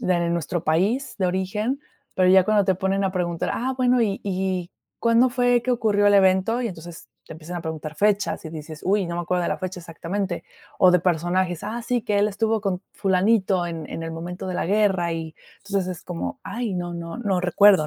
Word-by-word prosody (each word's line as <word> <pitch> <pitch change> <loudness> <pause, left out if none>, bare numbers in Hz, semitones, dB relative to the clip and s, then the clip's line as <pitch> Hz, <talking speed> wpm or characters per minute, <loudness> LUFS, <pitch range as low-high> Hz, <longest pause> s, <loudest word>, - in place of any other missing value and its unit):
de 175 -2 +1
nuestro 170 0 -2
país 205 - +1
de 185 - +2
origen. 210 +9 -1 0.3
Pero 185 -1 +3
ya 190 -1 +7
cuando 210 -1 +3
te 190 - +3
ponen 195 +1 0
a 190 - 0
preguntar: 175 -2 -1
"Ah, 260 +3 -1
bueno, 250 -1 +3
y 200 -2 -1
y 185 -2 -2 0.3
¿cuándo 230 +2 +4
fue 245 -1 +2
que 255 - -1
ocurrió 215 -4 +2
el 205 - +5
evento?" 195 +5 +3
Y 235 - -1
entonces, 175 0 -10 0.2
te - - -9
empiezan 165 +3 -7
a - - -6
preguntar 160 -1 -5
fechas 205 +3 +1
y - - -7
dices: 155 0 -8
"Uy, 200 0 +2
no 170 0 -4
me 175 - -1
acuerdo 180 +1 0
de - - 0
la - - -1
fecha 185 -1 -5
exactamente". 175 +3 -4 0.3
O 185 - +7
de 180 - +5
personajes, 175 +1 0
ah, 230 +3 -4
sí, 245 +1 0
que 205 -1 0
él 205 - +4
estuvo 220 +1 0
con 185 -3 -1
fulanito 190 -1 +2
en 165 -2 -5
en 165 - -5
el 165 0 -5
momento 175 +3 -6
de 185 - -3
la - - -1
guerra, 190 -4 +2
y, 160 -1 -5 0.3
entonces, 195 -2 -1
es - - -16
como, 180 +10 -5
ay, 235 -4 -3
no 175 -1 -3
no 170 +5 -6
no 195 -6 0
recuerdo, 180 -2 +5
185 Hz, 220 wpm, -24 LUFS, 175-210 Hz, 0.3 s, ya